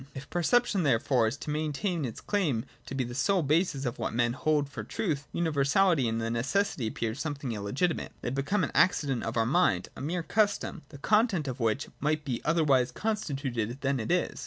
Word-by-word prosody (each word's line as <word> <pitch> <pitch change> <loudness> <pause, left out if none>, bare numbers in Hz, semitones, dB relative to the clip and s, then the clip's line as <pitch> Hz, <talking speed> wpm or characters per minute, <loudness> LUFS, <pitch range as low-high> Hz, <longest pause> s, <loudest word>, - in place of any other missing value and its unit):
If 135 0 -9
perception, 205 +3 +2
therefore, 125 -4 +2
is 115 +6 -2
to 150 - -5
maintain 155 +2 -1
its 115 - -6
claim 150 - 0 0.2
to 135 - -5
be 135 - 0
the 120 0 -6
sole 180 +8 +2
basis 150 -1 +1
of 120 -1 -3
what 110 0 -2
men 120 0 +2
hold 150 +1 +1
for 140 - -7
truth, 150 -8 -2
universality 160 -1 +2
and 115 0 -1
necessity 120 - 0
appear 110 0 -2
something 140 -1 -4
illegitimate: 115 - -1
they 120 - -2
become 140 +9 0
an - - -1
accident 140 -8 +3
of 115 +1 -3
our 115 - +3
minds, 120 - +2
a - - -8
mere 170 +5 -2
custom, 205 -3 0
the 145 - -11
content 205 - +2
of 130 0 -4
which 115 +4 0
might 150 +1 0
be 125 -4 -2
otherwise 140 -6 +3
constituted 135 - -2
than 140 -1 0
it 110 - -2
is. 180 0 0
140 Hz, 190 wpm, -29 LUFS, 120-170 Hz, 0.2 s, accident